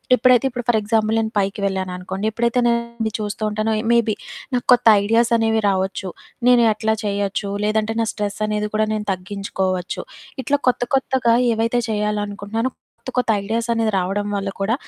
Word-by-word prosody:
ఎప్పుడైతే 255 +1 +4
ఇప్పుడు 245 -2 -6
for 235 - +4
example 220 +1 +1
నేను 220 0 -1
పైకి 195 +1 -1
వెళ్ళాననుకోండి 190 +1 -3
ఎప్పుడైతే 235 +2 +1
నేనది 235 -1 -1
చూస్తూ 210 0 -4
ఉంటానో 215 +1 -1 0.2
మేబీ 230 -2 +2 0.4
నాకు 245 - -1
కొత్త 245 -1 +2 0.2
ఐడియాస్ 230 +3 +2
అనేవి 225 0 +1
రావచ్చు. 190 0 -1 0.4
నేను 245 -1 +6
ఎట్లా 220 +1 0
చేయొచ్చు? 200 0 -1 0.2
లేదంటే 215 +1 0
నా - - +1
స్ట్రెస్ 205 -1 -4
అనేది 210 0 -1
కూడా 215 0 +2
నేను 210 -1 -3
తగ్గించుకోవచ్చు. 185 -1 -3 0.4
ఇట్లా 285 0 +1
కొత్త 245 - 0
కొత్తగా 265 -3 +2 0.2
ఏవైతే 230 +2 +1
చేయాలనుకుంటున్నానో 210 +2 -2 0.3
కొత్త 255 - -7
కొత్త 250 - +1
ఐడియాస్ 230 +3 -2
అనేది 225 -1 +1
రావడం 195 +3 -2
వల్ల 195 0 -2
కూడా 210 +4 +1
215 Hz, 155 wpm, -21 LUFS, 200-230 Hz, 0.4 s, నేను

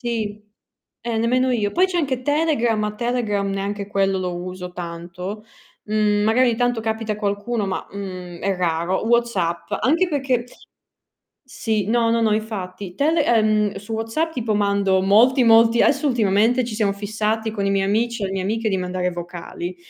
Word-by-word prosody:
Sì, 220 -4 -3 0.6
eh, 235 -1 -3
nemmeno 255 +3 +2
io. 215 -5 0
Poi 365 +2 +4
c'è 370 -2 -3
anche 265 -5 -1
Telegram, 290 -6 +1
ma 210 0 -2
Telegram 220 -4 -1
neanche 200 +1 -3
quello 195 -1 +1
lo 180 -1 -2
uso 180 0 -6
tanto. 180 +4 -7 0.4
Mhmm, 210 -1 +1
magari 225 +4 +3
ogni 230 - 0
tanto 245 -1 +1
capita 220 -1 -2
qualcuno, 205 +1 -2
ma, 190 - -3
mhmm, 185 -3 -7
è 195 -1 0
raro. 175 +2 0
WhatsApp, 175 -8 0
anche 330 +8 +3
perché 265 -6 0 1.0
sì, 220 -5 -2
no, 230 +1 +2
no, 230 0 +2
no, 220 -2 +2
infatti. 195 -4 -5
Tele 310 +2 +2
ehm, 215 -4 +2
su 205 +3 -8
WhatsApp 225 +9 -1
tipo 230 -5 -1
mando 200 -2 +2
molti, 235 +7 +5
molti 230 0 +6
adesso 300 - +2
ultimamente 230 +1 +2
ci 230 -2 -5
siamo 210 -2 +1
fissati 215 +2 -2
con 205 -2 -2
i 195 - +1
miei 195 -1 +1
amici 230 +2 0
e 195 - +1
le 190 - -5
mie 190 - -2
amiche 220 +3 -1
di 195 - 0
mandare 180 0 -2
vocali. 175 +1 -6
215 Hz, 170 wpm, -21 LUFS, 195-235 Hz, 1.0 s, molti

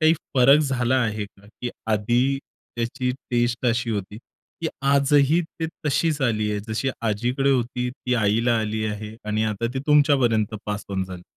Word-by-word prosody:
काही 160 +1 +5 0.2
फरक 135 +3 +7
झाला 130 -3 +1
आहे 105 -2 -2
का? 100 0 -18 0.2
की 120 - -2 0.2
आधी 120 +6 +2 0.4
त्याची 120 +2 -1 0.2
टेस्ट 120 +1 +1
अशी 120 0 +1
होती. 105 0 -4 0.4
की 160 - +1
आजही 140 +3 +4
ती 160 0 -5 0.2
तशीच 150 +1 +1
आली 110 -4 +1
आहे 105 -1 -2
जशी 110 +5 -1 0.2
आजीकडे 125 +6 +1
होती 125 -1 0
ती 125 0 -3
आईला 115 +2 +2
आली 110 0 -2
आहे 105 +1 -5
आणि 110 +1 0
आता 110 +2 -1
ती - - -1
तुमच्यापर्यंत 130 -7 +3
पास 105 0 -3
ओन 95 -1 -1
झाली. 90 -1 -9
120 Hz, 165 wpm, -23 LUFS, 105-135 Hz, 0.4 s, फरक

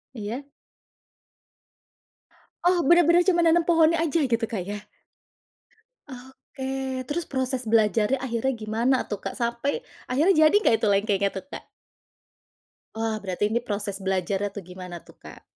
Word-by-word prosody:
Iya? 230 +5 -5 2.2
Oh, 355 0 +3
benar-benar 345 +1 +5
cuma 350 -2 +4
nanam 335 0 +4
pohonnya 330 -1 +4
aja, 330 -1 +1
gitu 230 -3 0
Kak, 205 -5 -4
ya? 205 +2 -7 1.2
Oke, 265 0 -6
terus 330 +3 -2
proses 260 -2 -2
belajarnya, 220 +3 +2
akhirnya 260 +1 -1
gimana 225 +5 +1
tuh 210 - -2
Kak, - - -4
sampai 235 - -1 0.3
akhirnya 305 +10 +3
jadi 310 - +4
nggak 230 - +4
itu 220 - 0
lengkengnya 200 -1 +1
tuh, 190 - -5
Kak? - - -8 1.3
Wah, 225 0 -1
berarti 190 +1 -1
ini 235 - +1
proses 205 -1 -2
belajarnya 190 +1 -1
tuh, 200 - -5
gimana 180 -1 -8
tuh - - -16
Kak? - - -12
245 Hz, 135 wpm, -25 LUFS, 210-290 Hz, 2.2 s, benar-benar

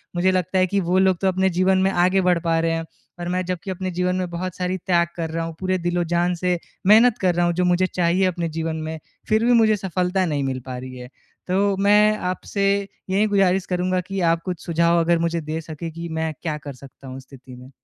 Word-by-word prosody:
मुझे 185 +2 +2
लगता 185 0 -1
है 185 - +3
कि 200 +2 0
वो 180 +2 +1
लोग 190 -2 +3
तो 190 - +2
अपने 190 +1 +2
जीवन 190 +1 +3
में 190 - +3
आगे 185 +2 +2
बढ़ 180 -2 +2
पा 165 -1 +1
रहे 165 0 +1
हैं 165 0 -2 0.3
और 175 - -4
मैं 185 +1 -1
जब 180 0 -2
कि 195 - -4
अपने 185 0 -4
जीवन 180 +1 -1
में 180 -1 -2
बहुत 175 +1 -5
सारी 185 +1 -2
त्याग 170 -1 +1
कर 165 -2 -3
रहा 165 +1 -3
हूँ, 165 -1 -7
पूरे 185 0 0
दिल-ओ-जान 175 0 0
से 180 0 0 0.3
मेहनत 225 +3 +6
कर 180 -2 +2
रहा 175 0 +2
हूँ, 175 - +1
जो 180 +1 0
मुझे 180 +1 +2
चाहिए 180 +2 +1
अपने 175 -2 -1
जीवन 160 0 -3
में 160 0 -5 0.3
फ़िर 220 +1 +3
भी 245 - +4
मुझे 220 -2 +4
सफलता 185 -1 -1
नहीं 145 -4 -1
मिल 130 -1 -2
पा 130 -1 -6
रही 130 0 -8
है। 125 0 -9 0.4
तो 195 +2 +1
मैं 210 +2 +4
आपसे 200 +2 -3 0.4
यही 200 +3 +2
गुज़ारिश 195 -2 +2
करूँगा 180 0 -1
कि 195 -1 -3
आप 165 0 -1
कुछ 180 -3 -5
सुझाव 170 0 +2
अगर 170 0 +2
मुझे 170 0 -1
दे 155 +1 -4
सकें 160 +1 -7
कि 170 +1 -7
मैं 160 0 -2
क्या 155 -3 -3
कर 145 -2 -8
सकता 135 +1 -14
हूँ 130 +1 -7
स्थिति 130 -1 -14
में? 125 +1 -13
180 Hz, 240 wpm, -22 LUFS, 165-185 Hz, 0.4 s, मेहनत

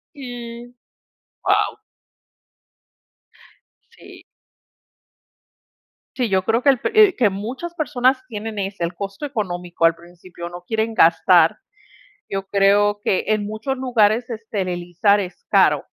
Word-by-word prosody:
Si, 245 -2 -9 0.7
wao. 430 - +1 2.2
Si. - - -14 1.9
Sí, 245 -3 -1
yo 190 -1 +1
creo 230 +4 +1
que 285 - +2
el 265 -3 +5
pe - - -2 0.2
eh, 375 - -7
que 225 -5 +3
muchas 250 - -6
personas 260 -5 +1
tienen 215 -1 -6
ese, 195 -3 -3
el 170 +1 -3
costo 195 +7 -6
económico 180 -10 -1
al 165 - +3
principio, 170 0 -11
no 175 0 -9
quieren 220 +2 -1
gastar. 165 0 +4 0.7
Yo 195 0 -4
creo 205 +1 +3
que 190 - 0
en 215 -1 0
muchos 220 +6 -4
lugares 235 -3 +2
esterilizar 200 -3 0
es 185 -2 -7
caro. - - +3
205 Hz, 120 wpm, -21 LUFS, 185-240 Hz, 2.2 s, el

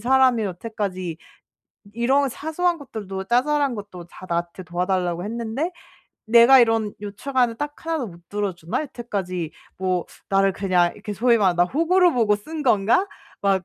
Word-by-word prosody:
사람이 255 -1 +4
여태까지 185 -3 -4 0.8
이런 265 +4 +2
사소한 335 +6 -1
것들도 200 -9 -6
자잘한 275 +4 +2
것도 200 -5 -8
다 185 - -12
나한테 170 +2 -2
도와달라고 180 0 -1
했는데 235 - -3 0.6
내가 235 +4 +7
이런 225 -3 +2
요청하는 230 +3 -1
딱 295 +2 -4
1 330 -1 0
도 250 - -3
못 170 -1 -16
들어주나? 195 - -2
여태까지 190 - -4 0.3
뭐 185 -2 0 0.2
나를 195 0 +3
그냥...' 180 -3 +2
이렇게 210 0 -7
소위 235 +2 +3
말하면 185 -4 +2
'나 175 - +5
호구로 340 - +3
보고 215 -4 +2
쓴 310 +9 -7
건가?' 235 - +3 0.3
막 195 -2 +2
215 Hz, 325 characters per minute, -23 LUFS, 185-260 Hz, 0.8 s, 내가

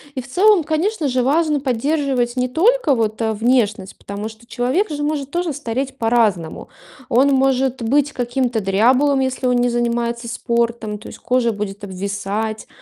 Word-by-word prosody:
И 260 - -2
в 245 - -13
целом, 385 +5 +4
конечно 320 +2 -1
же, 255 -1 +1
важно 300 +2 +2
поддерживать 265 -1 0
не 250 0 +1
только 345 - +3
вот, 220 -1 -1
э, 220 -1 0
внешность, 215 -4 0
потому 205 +2 -6
что 220 +1 -16
человек 260 - 0
же 295 -1 -3
может 290 -2 -2
тоже 345 +2 -1
стареть 265 0 -4
по-разному. 220 -9 0 0.4
Он 265 +4 +4
может 265 -1 +1
быть 285 +5 +1
каким-то 245 -1 -1
дряблым, 250 +9 +3
если 260 0 -1
он 250 -1 +3
не 245 0 +2
занимается 235 0 -1
спортом. 235 -2 -1
То 210 - -12
есть - - -11
кожа 245 -2 +1
будет 205 -1 -5
обвисать, 200 +3 -4
245 Hz, 165 wpm, -19 LUFS, 225-280 Hz, 0.4 s, целом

